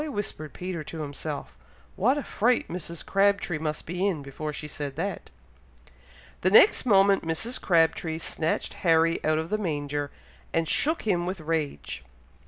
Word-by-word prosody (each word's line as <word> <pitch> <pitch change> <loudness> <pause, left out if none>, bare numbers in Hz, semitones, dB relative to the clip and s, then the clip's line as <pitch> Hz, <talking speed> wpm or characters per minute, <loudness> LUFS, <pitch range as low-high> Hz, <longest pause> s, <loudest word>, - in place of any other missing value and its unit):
whispered 175 - -4
Peter 180 -1 -5
to 160 +1 -7
himself. 145 - -5 0.4
"What 250 +9 +2
a 290 - -2
fright 240 +3 +1
Mrs. 170 -1 -5
Crabtree 195 -4 +2
must 155 -1 -3
be 180 +4 -1
in, 165 -8 -2
before 150 +2 -5
she 150 +1 -6
said 145 -2 -5
that!" 185 +5 -4 1.1
The 185 - +3
next 255 - +6
moment 195 -2 +5
Mrs. 170 +10 -2
Crabtree 165 -2 +2
snatched 165 -1 -1
Harry 165 -1 +3
out 155 0 +2
of 160 +3 -3
the 215 - +1
manger, 145 -5 -2 0.5
and 165 0 +1
shook 315 - +3
him 180 -5 +1
with 185 0 -3
rage. 155 - -3
165 Hz, 155 wpm, -27 LUFS, 155-195 Hz, 1.1 s, next